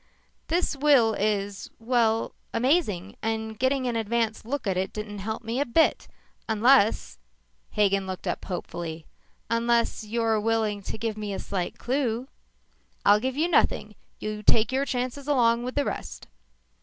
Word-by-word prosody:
"This 340 -1 0
will 275 -6 +4
is 205 -1 -1
well, 225 -1 +1 0.2
amazing, 230 - +1
and 220 -1 -3
getting 260 0 +1
an 240 -2 -1
advance 225 0 -1
look 275 +5 -3
didn't 205 +1 -3
help 220 +4 -4
me 230 +3 -2
a - - +3
bit 320 +7 +2 0.4
unless 220 - +3 0.3
" - - -42
Hagen 195 -2 +2
looked 185 -1 -6
up - - -2
hopefully. 170 -3 -5 0.2
" - - -40
unless 235 0 +1
you're 225 0 0
willing 220 -2 0
to 195 - -6
give 220 -1 -3
me 210 -2 -4
a - - -4
slight 185 -3 -3
clue 250 -2 -1 0.4
" - - -40
"I'll 205 +1 +6
give 260 +3 -2
you 320 +3 +2
nothing. 350 - +2 0.2
You 215 0 -4
take 225 +3 +3
your 270 +2 +1
chances 255 +1 -3
along 235 -5 +3
with 255 - -5
the 285 - +1
rest." - - -5
225 Hz, 155 wpm, -26 LUFS, 210-250 Hz, 0.4 s, I'll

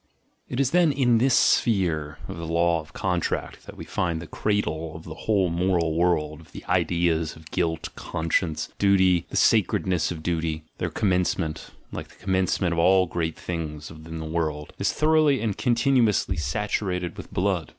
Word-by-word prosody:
It 125 - -3
is 135 -2 +2
then 175 -3 +4
in 125 -4 +3
this 130 +1 +3
sphere 80 -9 +2
of - - -6
the 85 -1 -5
law 85 0 +2
of 80 0 -11
contract 90 -3 -2
that - - -10
we - - -8
find 85 -2 -1
the 85 - -7
cradle 80 -5 -2
of 80 - -9
the 80 - -8
whole 95 0 +1
moral 85 -2 +1
world 80 -2 0
of 80 - -19
the - - -9
ideas 85 -2 +1
of 80 0 -15
"guilt," 80 -3 -1
"conscience," 80 0 -1
"duty," 95 -3 +3
the - - -3
"sacredness 90 -4 +2
of 80 -3 -6
duty," 80 -2 -2
— - - -43
their - - -1
commencement, 90 -4 -1 0.2
like - - -6
the - - -20
commencement 95 -1 0
of 85 - -1
all 95 +2 +5
great 80 -2 -3
things 80 -3 -5
in 80 +1 -9
the 80 - -5
world, 80 -2 -3
is - - +1
thoroughly 155 -3 +3
and 110 -4 -2
continuously 120 -6 +2
saturated 90 +2 -2
with - - -10
blood. 90 -4 0
85 Hz, 175 wpm, -25 LUFS, 80-100 Hz, 0.2 s, all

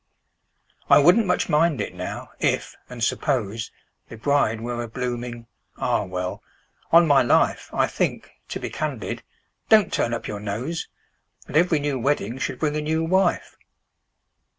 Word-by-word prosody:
"I - - +8
wouldn't 180 +9 +5
much 180 - +1
mind 155 -1 +2
it, - - -3
now—if—and 110 +6 -4
suppose— 115 -5 -1 0.4
The 115 - -9
bride 115 -3 +1
were 120 +1 -3
a 120 - -4
blooming—Ah! 120 -1 -4
well—on 90 - 0
my 145 -3 +5
life, 120 - +2
I - - +2
think—to - - -4
be - - -5
candid—(don't 215 -5 -1
turn 115 - +1
up 115 - -6
your 105 - -4
nose!) 115 +11 -4 0.6
That - - -9
every 165 0 +4
new 145 -2 -1
wedding 125 -2 -1
should - - -3
bring 150 -1 -1
a - - -1
new 160 +2 0
wife!" 185 +2 +1
130 Hz, 130 wpm, -24 LUFS, 115-160 Hz, 0.6 s, I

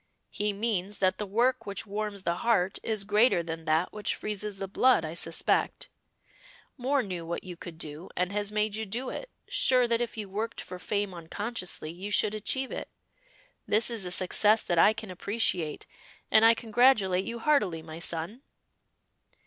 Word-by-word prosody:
"He 210 0 0
means 205 -2 -2
that 185 -1 +1
the 210 - -3
work 230 +3 +1
which 200 +1 -5
warms 205 -1 -4
the 170 -1 0
heart 195 -4 +1
is 215 -3 -1
greater 210 -2 +3
than 165 -1 -6
that 160 +3 +1
which 210 0 -1
freezes 210 -1 -4
the 195 0 -4
blood, 245 -2 +3
I 155 - -5
suspect. 165 -1 0 0.9
Moor 265 +1 +1
knew 180 -4 -5
what 170 +1 -4
you 180 -1 -7
could 170 -1 -9
do 155 +1 -6
and 180 +1 0
has 205 0 -1
made 210 0 0
you 220 0 -3
do 240 +6 -2
it, - - -6 0.2
sure 250 -2 +4
that 235 0 +1
if 235 -1 -3
you 210 -2 -4
worked 215 +4 -4
for 180 0 -7
fame 205 0 -2
unconsciously 180 -1 -3
you 185 +4 -7
should 210 0 +2
achieve 260 +5 -1
it. - - -5 0.8
This 220 +3 +3
is 225 -4 -1
a - - -5
success 210 +4 +3
that 175 -2 +1
I 210 - +7
can 215 -2 -7
appreciate, 180 -5 0 0.5
and 220 - +6
I 230 0 +7
congratulate 220 -5 +3
you 235 - -4
heartily, 210 - +1
my 160 0 -9
son." 170 +8 -3
205 Hz, 180 wpm, -29 LUFS, 180-225 Hz, 0.9 s, I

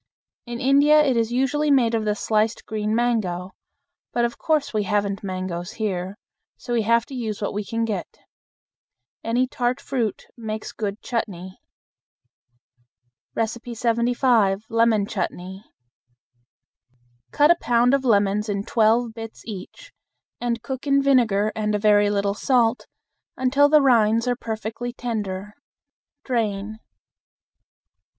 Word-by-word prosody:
In 240 0 -5
India 290 +3 +5
it 265 -3 +2
is 230 0 0
usually 270 +4 +1
made 250 -5 +3
of 220 -1 0
the 210 -1 +1
sliced 215 +1 0
green 215 0 -2
mango; 200 -7 -1 0.6
but 240 0 +1
of 235 - -3
course 310 -5 0
we 215 - +1
haven't 200 -1 -1
mangoes 185 -2 -4
here, 195 -2 -3 0.4
so 240 - -5
we 235 - +2
have 230 +2 +2
to - - -12
use 220 -5 -4
what 205 - -3
we 210 +1 -2
can 230 +2 -2
get. 200 -6 -5 1.1
Any 240 +3 +1
tart 250 0 -1
fruit 240 -8 -3
makes 220 -2 -5
good 205 -1 -5
chutney. 190 -6 -4 1.8
75. 235 -2 +1
Lemon 230 -2 +3
Chutney. 190 0 -5 1.6
Cut 295 - +4
a - - +5
pound 240 +1 +3
of 275 -1 +2
lemons 210 -2 +2
in 200 -1 -1
twelve 225 +2 +2
bits 225 -1 -9
each, 225 - -9 0.5
and 235 -1 -2
cook 265 +1 -5
in 275 0 +3
vinegar 225 -6 +3
and 210 -1 -1
a - - +2
very 205 0 +4
little 200 -1 0
salt 235 +1 +1 0.5
until 275 +3 +3
the 300 -1 +5
rinds 230 -2 +3
are 245 - +1
perfectly 225 +1 -5
tender. 210 -5 -4 0.7
Drain. 215 -3 -2
225 Hz, 130 wpm, -23 LUFS, 205-245 Hz, 1.8 s, India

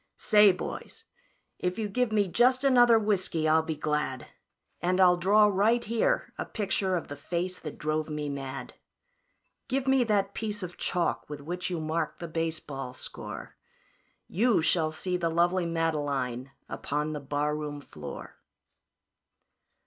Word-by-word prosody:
"Say, 210 -1 +6
boys, 185 - -6 0.6
if 180 0 -1
you 220 -2 -1
give 245 +3 0
me 205 -2 +2
just 255 +7 +3
another 245 -4 +6
whiskey 190 -7 0
I'll 160 +1 +5
be 160 0 -3
glad, 150 -4 -2 0.6
And 180 +1 +1
I'll 180 -1 +7
draw 200 +5 +5
right 210 +4 +3
here 235 - 0
a - - -2
picture 195 -3 -1
of 170 - -3
the 145 - -6
face 175 +5 -3
that 150 - -7
drove 155 +1 -1
me 150 -1 -3
mad. 135 -2 -5 0.9
Give 265 0 -1
me 265 -1 +4
that 200 -2 +1
piece 210 -2 -4
of 175 -1 -6
chalk 175 -4 -1
with 150 -1 -6
which 175 +5 -4
you 175 -2 -2
mark 155 0 -2
the 170 - -6
baseball 155 -6 -4
score - - -8 0.7
You 230 +4 +2
shall 160 -1 +2
see 180 +3 -2
the 170 -1 0
lovely 175 +2 +2
Madeline 145 -6 -1 0.2
upon 150 +2 -2
the 150 - -4
barroon 145 +1 -2
floor." 145 - -9
170 Hz, 150 wpm, -28 LUFS, 150-205 Hz, 0.9 s, I'll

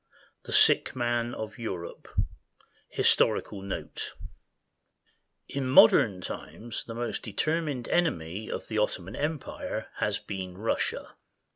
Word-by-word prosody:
Ill - - -31
THE - - -5
SICK - - +5
MAN 120 -1 0
OF 110 +2 -6
EUROPE 90 -7 -5 0.8
HISTORICAL 100 - +3
NOTE 95 0 -5 1.3
In 135 -2 -2
modern 105 -6 +7
times 115 +5 -6
the 115 - -7
most 120 0 -2
determined 145 +3 -1
enemy 105 - 0
of - - -4
the 110 -1 -1
Otto 105 -3 0
man 95 - -8
Empire 150 0 -3
has - - +1
been 95 -2 -6
Russia. 110 +3 -1
115 Hz, 120 wpm, -28 LUFS, 95-130 Hz, 1.3 s, modern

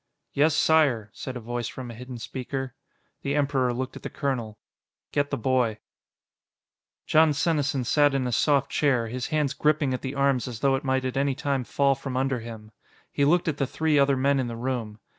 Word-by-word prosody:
"Yes, 150 +2 +3
Sire," 135 -12 +3
said 130 -1 -6
a - - -5
voice 120 0 -4
from 125 -2 -7
a - - -8
hidden 125 +2 -8
speaker. 130 +2 -5 0.5
The 140 0 -1
Emperor 140 -3 +1
looked 130 +2 -4
at - - -9
the - - -5
colonel. 120 -7 -3 0.5
"Get 145 0 0
the - - -2
boy." 120 -2 +1 1.3
Jon 155 -1 +4
Senesin 145 -3 0
sat 145 +3 +3
in 135 -2 0
a 125 - -1
soft 140 +3 +2
chair, 125 -6 +1
his 125 +1 -3
hands 150 -3 0
gripping 150 -2 +1
at 125 - -3
the 135 +1 -4
arms 140 -2 +1
as 120 -3 -7
though 135 -1 +3
it 135 - -3
might 130 -1 0
at 130 0 -2
any 140 -1 +1
time 140 -3 -1
fall 140 +3 +2
from 135 -1 -5
under 135 -1 0
him. 110 -2 -9 0.4
He 140 - +1
looked 170 +4 +3
at 150 -3 0
the 135 - 0
three 155 +1 +1
other 140 -1 +3
men 140 +1 +2
in 130 - -1
the 115 - -5
room. 120 -4 -3
135 Hz, 205 wpm, -26 LUFS, 125-140 Hz, 1.3 s, Jon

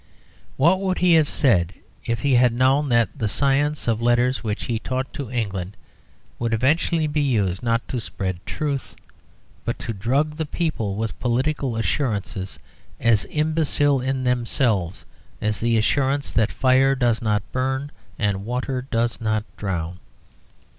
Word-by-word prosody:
What 170 +7 +4
would 190 -2 0
he 180 -1 +4
have 155 -3 +4
said 90 - +2 0.3
if 115 -1 -1
he 140 -2 +2
had 125 -1 +5
known 135 +4 +3
that 120 -2 +3
that 115 -6 -1
science 140 +6 +1
of 115 -1 +1
letters 120 +2 +2
which 105 -2 -3
he 115 -2 -2
taught 130 +2 -3
to 140 -5 -5
England 100 -6 -3 0.6
would 115 -1 0
eventually 155 +6 +2
be 150 0 0
used 105 -10 +1
not 115 -1 0
to 125 - -2
spread 95 -4 -4
truth, 145 -3 -3 0.7
but - - -2
to 115 - -4
drug 135 +9 0
the 160 - -1
people 145 - -2
with 110 +1 -4
political 130 +1 0
assurances 105 -5 -2 0.4
as 115 -4 +3
imbecile 150 -3 +1
in 130 0 -1
themselves 120 - 0 0.3
as 105 -1 -1
the 115 0 +2
assurance 135 +5 +1
that 110 -2 +2
fire 135 +1 +3
does 120 -3 +1
not 105 -2 +1
burn 130 +2 -1 0.3
and 100 -2 0
water 125 +3 -2
does 115 0 0
not 110 -1 0
drown? 90 -3 -3
125 Hz, 150 wpm, -23 LUFS, 110-140 Hz, 0.7 s, had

